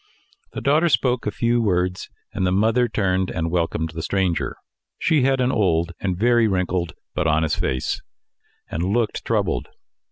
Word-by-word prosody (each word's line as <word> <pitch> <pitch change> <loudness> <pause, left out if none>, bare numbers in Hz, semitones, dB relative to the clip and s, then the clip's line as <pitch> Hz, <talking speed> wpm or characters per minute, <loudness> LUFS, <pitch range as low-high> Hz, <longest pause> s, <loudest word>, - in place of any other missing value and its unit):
The - - -5
daughter 155 +5 +3
spoke 125 -6 +1
a - - +1
few 120 +3 +1
words, 90 -3 0 0.2
and - - -2
the 90 - +2
mother 115 +6 +3
turned 95 -4 0
and 80 0 -2
welcomed 85 -2 -1
the 80 0 -5
stranger. 95 -1 -1 0.4
She 155 -3 +2
had 135 +1 +2
an 125 0 +2
old 85 -6 +1
and 95 -3 -2
very 120 +2 +4
wrinkled, 90 -3 -1 0.2
but - - 0
honest 80 0 +1
face, 65 - -1 0.7
and 85 - -4
looked 105 +4 0
troubled. - - 0
95 Hz, 160 wpm, -22 LUFS, 85-120 Hz, 0.7 s, very